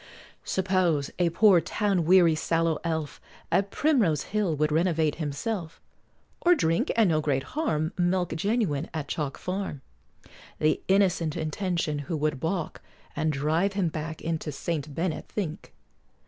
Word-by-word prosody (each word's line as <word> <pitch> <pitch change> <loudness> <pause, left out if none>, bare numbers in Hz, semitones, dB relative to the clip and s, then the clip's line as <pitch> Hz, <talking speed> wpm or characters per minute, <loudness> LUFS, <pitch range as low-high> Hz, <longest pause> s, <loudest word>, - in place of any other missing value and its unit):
Suppose 185 -6 +1
a 175 -1 +3
poor 180 0 +5
town 195 -4 0
weary 175 -1 +6
sallow 165 0 0
elf 160 -3 -3 0.3
At 200 +1 +2
Primrose 210 - +2
hill 205 -6 -1
would 150 +1 +1
renovate 160 -2 +2
himself, 160 +4 -3 0.6
Or 355 0 +5
drink 165 - +1
(and 225 -4 +4
no 155 -1 +2
great 135 -3 0
harm) 165 - -1
Milk 180 0 +1
genuine 180 - 0
at 150 -2 -3
Chalk 145 -2 -3
Farm, 185 -6 -4 0.8
The 155 0 +1
innocent 185 -5 +2
intention 160 -1 -1
who 155 +3 -3
would 150 -2 -1
balk, 165 +1 -3 0.3
And 155 0 +1
drive 155 +7 +1
him 190 -4 +1
back 160 0 -6
into 160 -1 -2
St. 145 0 -4
Bennet 170 -1 -3
Fink? 185 -3 -4
165 Hz, 140 wpm, -27 LUFS, 155-190 Hz, 0.8 s, weary